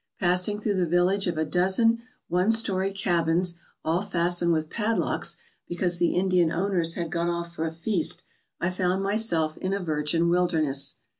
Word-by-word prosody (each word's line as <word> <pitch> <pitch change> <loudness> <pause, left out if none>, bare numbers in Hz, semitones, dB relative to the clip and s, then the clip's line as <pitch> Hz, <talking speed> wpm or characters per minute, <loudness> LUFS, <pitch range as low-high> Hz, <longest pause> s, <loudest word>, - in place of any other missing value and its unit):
Passing 180 +3 +1
through 210 -2 -1
the 180 -2 +1
village 180 +4 +2
of 170 -2 -2
a 160 - +1
dozen 190 +8 +2 0.3
one 180 +4 +1
story 195 -4 +1
cabins 175 -2 +1 0.3
all 165 +3 +1
fastened 175 -3 0
with 155 -1 -1
padlocks 225 0 0 0.3
be 175 - -5
cause 175 0 0
the 175 - +2
Indian 180 -3 +2
owners 175 -2 0
had 170 -2 -3
gone 170 -1 0
off 170 0 -4
for 165 -1 -2
a - - -4
feast, 170 +2 +1 0.4
I 175 - 0
found 185 +1 0
myself 195 -7 0
in 185 +1 -2
a 200 - -1
virgin 165 -1 0
wilderness. 165 -6 +1
175 Hz, 170 wpm, -26 LUFS, 170-195 Hz, 0.4 s, village